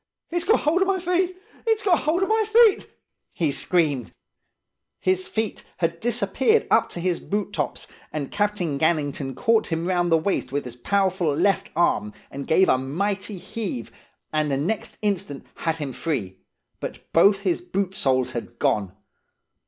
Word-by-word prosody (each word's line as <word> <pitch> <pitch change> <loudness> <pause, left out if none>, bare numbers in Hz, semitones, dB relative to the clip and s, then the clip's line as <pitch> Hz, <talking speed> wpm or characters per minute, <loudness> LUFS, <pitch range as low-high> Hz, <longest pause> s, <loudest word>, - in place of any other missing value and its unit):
"'It's 345 0 0
got 440 +5 +4
hold 330 +5 +2
of 385 - +3
my 390 -1 +2
feet! 360 +1 0 0.3
It's 445 -1 +2
got 375 -4 +4
hold 335 +5 +1
of 385 - -1
my 440 0 +3
feet!' 440 -1 +5 0.5
he 160 -4 +1
screamed. 145 - +1 0.9
His 185 0 0
feet, 220 -2 -2
had 170 -1 -1
disappeared 250 - +2
up - - +4
to - - -6
his 175 0 0
boot 205 0 -3
tops, - - -3 0.3
and 145 -3 -4
Captain 205 -8 0
Gannington 145 -4 +1
caught 225 -1 +2
him 165 0 -2
round 175 -2 +1
the 165 - +6
waist 160 -6 -1
with 140 0 -2
his 120 -1 -7
powerful 185 +1 +1
left 195 +6 +1
arm, 105 -10 +1 0.3
gave 190 +4 +4
a 130 - +3
mighty 195 +9 -2
heave, 180 - -5 0.4
and 155 -1 +1
the 135 - +1
next 180 +10 -2
instant 180 -9 -2
had 165 -1 -2
him 145 -4 -4
free; 105 - -3 0.4
but - - -8
both 195 +4 +5
his 185 -4 0
boot 190 +1 -2
soles 130 -6 +1
had 120 - -6
gone. 105 -10 0
180 Hz, 165 wpm, -24 LUFS, 145-220 Hz, 0.9 s, the